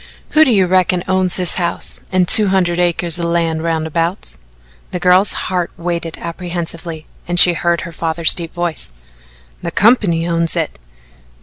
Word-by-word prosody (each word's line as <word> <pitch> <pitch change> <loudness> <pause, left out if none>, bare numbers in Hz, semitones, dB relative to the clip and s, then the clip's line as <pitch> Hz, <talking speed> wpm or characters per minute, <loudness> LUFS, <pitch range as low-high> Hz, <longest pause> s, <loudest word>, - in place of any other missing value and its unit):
"Who 310 - +5
do 265 - +2
you 195 -4 +3
reckon 180 -1 +1
owns 185 -1 0
this 180 -3 +3
house 175 -2 -4
and 185 -1 +1
two 210 +3 +7
hundred 180 -2 0
acres 175 -1 0
o' - - -3
land 165 -2 -1
roundabouts?" 165 - -3 0.5
The 180 - -5
girl's 185 +3 +3
heart 180 -2 -2
waited 170 -1 -4
apprehensively 170 -2 -7 0.2
and 175 0 +1
she 175 - +8
heard 170 0 -1
her 170 - -8
father's 165 0 +3
deep 170 -2 -3
voice. 175 - -3 0.7
"The - - -4
company 195 -7 +2
owns 170 0 -1
it." 165 - -3
175 Hz, 160 wpm, -16 LUFS, 165-185 Hz, 0.7 s, she